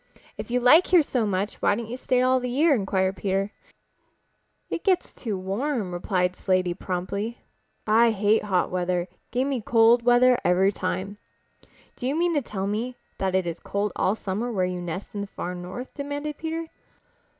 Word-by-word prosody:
"If -, -, -7 dB
you 250 Hz, +1 st, +1 dB
like 280 Hz, +9 st, +6 dB
here 355 Hz, -3 st, +5 dB
so 245 Hz, -6 st, 0 dB
much 200 Hz, +1 st, -2 dB
why -, -, +3 dB
don't 235 Hz, +2 st, -4 dB
you 235 Hz, -, -5 dB
stay 255 Hz, 0 st, +1 dB
all 255 Hz, 0 st, +3 dB
the 250 Hz, 0 st, -3 dB
year?" 295 Hz, +5 st, +3 dB
inquired 190 Hz, -4 st, 0 dB
Peter. 195 Hz, +2 st, -1 dB, 1.2 s
"It -, -, -4 dB
gets 375 Hz, -3 st, +1 dB
too 215 Hz, -5 st, -4 dB
warm," 200 Hz, +3 st, -2 dB
replied 180 Hz, 0 st, 0 dB
Slaty 185 Hz, -2 st, +1 dB
promptly, 195 Hz, +5 st, -4 dB, 0.5 s
"I 225 Hz, +2 st, +5 dB
hate 210 Hz, 0 st, +2 dB
hot 185 Hz, -3 st, +1 dB
weather. 180 Hz, -1 st, -1 dB, 0.2 s
Give 255 Hz, +3 st, 0 dB
me 270 Hz, -4 st, -1 dB
cold 230 Hz, +2 st, +5 dB
weather 245 Hz, +1 st, +5 dB
every 190 Hz, +2 st, +3 dB
time." 200 Hz, +1 st, -4 dB, 0.8 s
"Do 250 Hz, -, -4 dB
you 275 Hz, -, 0 dB
mean 345 Hz, +1 st, +1 dB
to 295 Hz, -, +2 dB
tell 195 Hz, -6 st, -4 dB
me 230 Hz, +5 st, -3 dB, 0.2 s
that 190 Hz, -1 st, 0 dB
it 190 Hz, -1 st, +2 dB
is 170 Hz, -1 st, -4 dB
cold 200 Hz, 0 st, -2 dB
all 195 Hz, -, +1 dB
summer 220 Hz, +4 st, -3 dB
where 190 Hz, -5 st, +1 dB
you 180 Hz, -1 st, -3 dB
nest 175 Hz, +2 st, -6 dB
in 205 Hz, -, -3 dB
the 200 Hz, -, -4 dB
Far 180 Hz, -2 st, -5 dB
North?" 180 Hz, +8 st, -7 dB
demanded 290 Hz, +1 st, -4 dB
Peter. 325 Hz, +1 st, -3 dB
210 Hz, 185 wpm, -25 LUFS, 190-250 Hz, 1.2 s, like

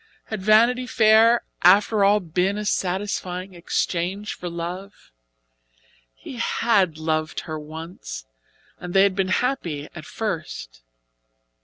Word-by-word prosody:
Had 220 Hz, -3 st, -4 dB
Vanity 235 Hz, +5 st, +4 dB
Fair 225 Hz, +1 st, +5 dB, 0.2 s
after 200 Hz, +3 st, +5 dB
all 205 Hz, +1 st, +5 dB
been 180 Hz, +3 st, -1 dB
a 210 Hz, -, -4 dB
satisfying 185 Hz, -1 st, -2 dB
exchange 180 Hz, +3 st, -2 dB
for 175 Hz, -, -6 dB
love? 175 Hz, +4 st, -7 dB, 1.0 s
He 250 Hz, -, -10 dB
had 200 Hz, -7 st, +1 dB
loved 155 Hz, 0 st, -2 dB
her 155 Hz, -1 st, -6 dB
once, 155 Hz, -, -8 dB, 0.5 s
and 180 Hz, 0 st, -7 dB
they 195 Hz, -, +7 dB
had 200 Hz, -2 st, +2 dB
been 195 Hz, -1 st, 0 dB
happy 185 Hz, -, -1 dB
at 155 Hz, -, -9 dB
first. -, -, -5 dB
185 Hz, 120 wpm, -23 LUFS, 170-210 Hz, 1.0 s, they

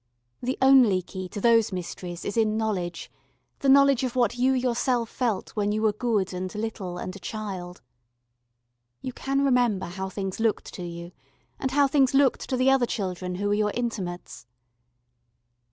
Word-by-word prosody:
The 255 Hz, +2 st, -2 dB
only 250 Hz, -9 st, +6 dB
key 185 Hz, 0 st, -7 dB
to 205 Hz, -, -6 dB
those 230 Hz, -1 st, +4 dB
mysteries 180 Hz, -1 st, -6 dB
is 205 Hz, -, -3 dB
in 220 Hz, -1 st, +2 dB
knowledge, 185 Hz, -6 st, -3 dB, 0.5 s
the 275 Hz, -, +1 dB
knowledge 275 Hz, -1 st, +5 dB
of 255 Hz, -1 st, -2 dB
what 240 Hz, -2 st, +2 dB
you 255 Hz, +2 st, +2 dB
yourself 245 Hz, -2 st, 0 dB
felt 235 Hz, -7 st, -2 dB
when 205 Hz, -1 st, -1 dB
you 215 Hz, +1 st, -1 dB
were 215 Hz, -1 st, +3 dB
good 215 Hz, -4 st, -1 dB
and 185 Hz, 0 st, -4 dB
little 210 Hz, -5 st, -4 dB
and 185 Hz, +1 st, -6 dB
a -, -, -9 dB
child. 185 Hz, -, -6 dB, 1.2 s
You 255 Hz, -, -4 dB
can 275 Hz, +2 st, 0 dB
remember 245 Hz, -8 st, +2 dB
how 190 Hz, +2 st, -5 dB
things 195 Hz, 0 st, -4 dB
looked 225 Hz, -1 st, -1 dB
to 180 Hz, -, -6 dB
you, 170 Hz, 0 st, -7 dB, 0.5 s
and 265 Hz, -, -1 dB
how 285 Hz, +2 st, +4 dB
things 270 Hz, -1 st, +3 dB
looked 275 Hz, -2 st, +2 dB
to 260 Hz, -, 0 dB
the 260 Hz, +1 st, +4 dB
other 265 Hz, -3 st, +3 dB
children 185 Hz, -4 st, -3 dB
who 205 Hz, +2 st, -1 dB
were -, -, +2 dB
your 210 Hz, 0 st, +1 dB
intimates. 180 Hz, -, -4 dB
215 Hz, 170 wpm, -26 LUFS, 185-250 Hz, 1.2 s, only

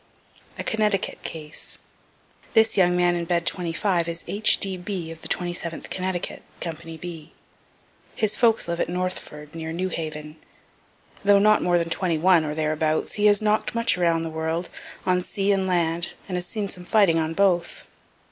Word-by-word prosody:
A -, -, -3 dB
CONNECTICUT 210 Hz, -3 st, 0 dB
CASE 155 Hz, -2 st, -5 dB, 0.8 s
This 220 Hz, 0 st, +5 dB
young 180 Hz, -2 st, +4 dB
man 175 Hz, 0 st, +4 dB
in 170 Hz, -1 st, -2 dB
bed 170 Hz, 0 st, 0 dB
25 175 Hz, 0 st, 0 dB
is 170 Hz, 0 st, -4 dB
H. 210 Hz, +2 st, +4 dB
D. 195 Hz, -1 st, -2 dB
B. 180 Hz, -2 st, -5 dB
of 165 Hz, 0 st, -10 dB
the -, -, -6 dB
27th 175 Hz, -2 st, -3 dB
Connecticut, 185 Hz, -1 st, -3 dB, 0.2 s
company 165 Hz, -1 st, -6 dB
B. 165 Hz, -2 st, -8 dB, 0.8 s
His 215 Hz, -2 st, +1 dB
folks 225 Hz, -6 st, +3 dB
live 170 Hz, 0 st, -2 dB
at -, -, 0 dB
Northford, 175 Hz, -4 st, -4 dB
near 160 Hz, -1 st, -5 dB
New 185 Hz, +3 st, -2 dB
Haven. 155 Hz, -2 st, -5 dB, 0.9 s
Though 200 Hz, 0 st, +6 dB
not 215 Hz, +1 st, +5 dB
more 175 Hz, 0 st, +3 dB
than 165 Hz, -1 st, -1 dB
twenty 175 Hz, -3 st, 0 dB
one, 175 Hz, 0 st, +5 dB
or 150 Hz, -1 st, -3 dB
thereabouts, 155 Hz, 0 st, 0 dB
he 210 Hz, 0 st, +3 dB
has 205 Hz, 0 st, +4 dB
knock'd 215 Hz, +2 st, +1 dB
much 230 Hz, 0 st, +3 dB
around 170 Hz, -2 st, +2 dB
the 165 Hz, -, -4 dB
world, 160 Hz, +2 st, -2 dB, 0.4 s
on 180 Hz, 0 st, +3 dB
sea 195 Hz, +2 st, -1 dB
and 190 Hz, -1 st, +1 dB
land, 170 Hz, -1 st, 0 dB
and 185 Hz, -, -3 dB
has 180 Hz, 0 st, -2 dB
seen 210 Hz, 0 st, -3 dB
some 180 Hz, -2 st, -9 dB
fighting 180 Hz, -4 st, +4 dB
on 160 Hz, 0 st, -1 dB
both. 180 Hz, -3 st, +1 dB
175 Hz, 175 wpm, -24 LUFS, 165-195 Hz, 0.9 s, Though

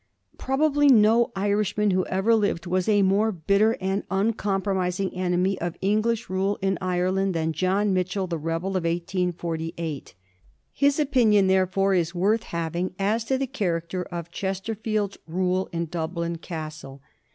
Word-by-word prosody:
Probably 290 Hz, +2 st, +2 dB
no 230 Hz, -2 st, +5 dB
Irishman 205 Hz, +1 st, +1 dB
who 185 Hz, 0 st, +1 dB
ever 195 Hz, +5 st, +2 dB
lived 205 Hz, -6 st, +1 dB
was 185 Hz, +2 st, 0 dB
a 205 Hz, -2 st, +4 dB
more 200 Hz, +3 st, +3 dB
bitter 200 Hz, +5 st, +2 dB
and 190 Hz, +2 st, -1 dB
uncompromising 195 Hz, -2 st, -1 dB
enemy 185 Hz, +1 st, 0 dB
of 175 Hz, 0 st, -3 dB
English 215 Hz, +3 st, 0 dB
rule 195 Hz, +2 st, -1 dB
in 195 Hz, -2 st, 0 dB
Ireland 185 Hz, +1 st, 0 dB
than 160 Hz, 0 st, 0 dB
John 190 Hz, +5 st, +1 dB
Mitchel, 185 Hz, +1 st, -1 dB
the 170 Hz, -2 st, -3 dB
rebel 165 Hz, +4 st, -2 dB
of 185 Hz, -2 st, -1 dB
1848. 170 Hz, -, -3 dB, 0.6 s
His 285 Hz, +1 st, +2 dB
opinion, 240 Hz, -9 st, +4 dB
there 190 Hz, 0 st, +3 dB
fore, 195 Hz, +1 st, +1 dB
is 170 Hz, -1 st, 0 dB
worth 205 Hz, +6 st, +2 dB
having 170 Hz, +2 st, -3 dB
as 210 Hz, +4 st, 0 dB
to 265 Hz, +3 st, +1 dB
the 270 Hz, -, -1 dB
character 185 Hz, -8 st, -2 dB
of 170 Hz, -1 st, -7 dB
Chesterfield's 205 Hz, +2 st, -3 dB
rule 185 Hz, +2 st, 0 dB
in 170 Hz, 0 st, -2 dB
Dublin 170 Hz, +1 st, -3 dB
Castle. 155 Hz, -5 st, -8 dB
190 Hz, 145 wpm, -25 LUFS, 175-210 Hz, 0.6 s, no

